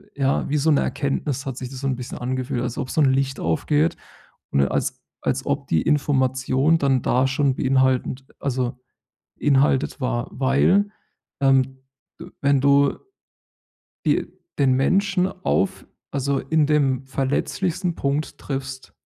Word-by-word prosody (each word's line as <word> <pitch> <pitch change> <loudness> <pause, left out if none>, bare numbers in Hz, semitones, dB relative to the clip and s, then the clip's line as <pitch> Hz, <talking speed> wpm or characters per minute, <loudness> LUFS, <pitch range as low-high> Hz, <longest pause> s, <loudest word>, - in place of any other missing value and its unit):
ja, 140 -1 +1
wie 150 - +1
so 150 +2 +2
'ne 145 - +3
Erkenntnis 140 -1 -2
hat 135 -3 -5
sich 130 -2 -5
das 135 -1 -8
so 135 - -1
'n 130 - 0
bisschen 125 0 -7
angefühlt, 125 -1 -2
als 120 -1 -3
ob 130 - -3
so 155 - +1
'n 135 -3 +5
Licht 135 -1 0
aufgeht. 150 - +1 0.5
Und 70 - +3
als - - -2 0.2
als - - -1
ob - - -2
die 80 - +2
Information 135 +1 +2
dann 135 -4 +2
da 130 +1 +2
schon 140 -1 +1
beinhaltend 130 0 +1
also 125 -2 -2 0.6
inhaltet 140 0 +2
war. 125 -2 -1
Weil 140 +10 +2 0.5
ähm, 135 -1 +3 0.4
de - - -8
wenn 140 -1 +3
du 140 +1 +4 1.1
die - - +2 0.3
den 135 -2 +4
Menschen 185 +6 +2 0.2
auf 195 -1 0 0.2
also 140 0 0
in 155 +1 +1
dem 135 -3 +1
verletzlichsten 165 +6 -1
Punkt 145 0 -2
triffst 135 -1 -6
135 Hz, 145 wpm, -23 LUFS, 130-145 Hz, 1.1 s, n